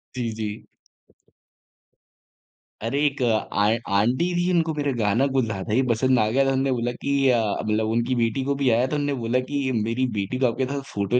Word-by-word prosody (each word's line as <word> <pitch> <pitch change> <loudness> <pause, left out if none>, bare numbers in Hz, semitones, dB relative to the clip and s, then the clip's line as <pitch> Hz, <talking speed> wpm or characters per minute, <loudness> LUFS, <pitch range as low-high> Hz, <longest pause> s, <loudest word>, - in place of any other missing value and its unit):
जी, 120 -2 -2
जी। 110 -1 -5 2.2
अरे 115 +6 -1
एक 140 -2 -1
आ 110 -3 +1 0.3
आंटी 120 +10 +2
थीं 175 +1 +1
उनको 165 -2 +1
मेरा 145 -2 -1
गाना 115 +5 +2
कुछ 130 -3 +3
ज़्यादा 105 -1 -4
ही 130 - +4
पसंद 130 +2 +2
आ 110 - +2
गया 135 +4 +2
था। 135 - +2
उन्होंने 135 0 +1
बोला 120 -1 -1
कि 140 - -1 0.2
अ, 120 -2 +4 0.2
मतलब 110 0 0
उनकी 120 +3 0
बेटी 115 +2 0
को 140 0 0
भी 130 - +3
आया 120 +3 +3
तो 150 - -3
उन्होंने 145 -1 -1
बोला 115 +2 +1
कि 140 -2 -1
मेरी 125 +3 0
बेटी 100 +6 -3
को 130 - +2
आपके 125 +3 -1
साथ 140 -1 -3
फोटो 100 +5 +1
125 Hz, 200 wpm, -24 LUFS, 110-135 Hz, 2.2 s, ही